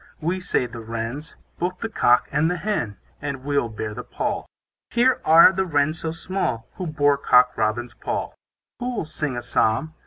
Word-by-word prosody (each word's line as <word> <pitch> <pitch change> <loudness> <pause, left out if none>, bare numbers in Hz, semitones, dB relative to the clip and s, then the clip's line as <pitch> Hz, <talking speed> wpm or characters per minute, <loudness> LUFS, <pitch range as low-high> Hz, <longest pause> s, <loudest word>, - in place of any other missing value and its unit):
We, 175 +4 -1
say 180 -8 0
the 120 -1 -8
Wrens, 115 +7 -5 0.2
Both 180 +1 -1
the 225 - -1
cock 125 - +3
and 150 +3 +2
the 180 - -1
hen, 170 - -2 0.2
And 140 -3 -4
we'll 140 -4 0
bear 110 -1 -5
the - - -5
pall. - - -3 0.4
Here 250 +2 +3
are 165 +4 +8
the 190 +1 +1
Wrens 155 0 +1
so 160 - -3
small, 165 -9 -3
Who 185 - -3
bore 145 -2 +2
Cock 125 -2 +5
Robin's 110 +2 -1
pall. - - -4 0.5
Who'll 245 -7 -2
sing 150 -4 -3
a 120 - -4
psalm? 125 +6 +1
145 Hz, 180 wpm, -23 LUFS, 120-175 Hz, 0.5 s, are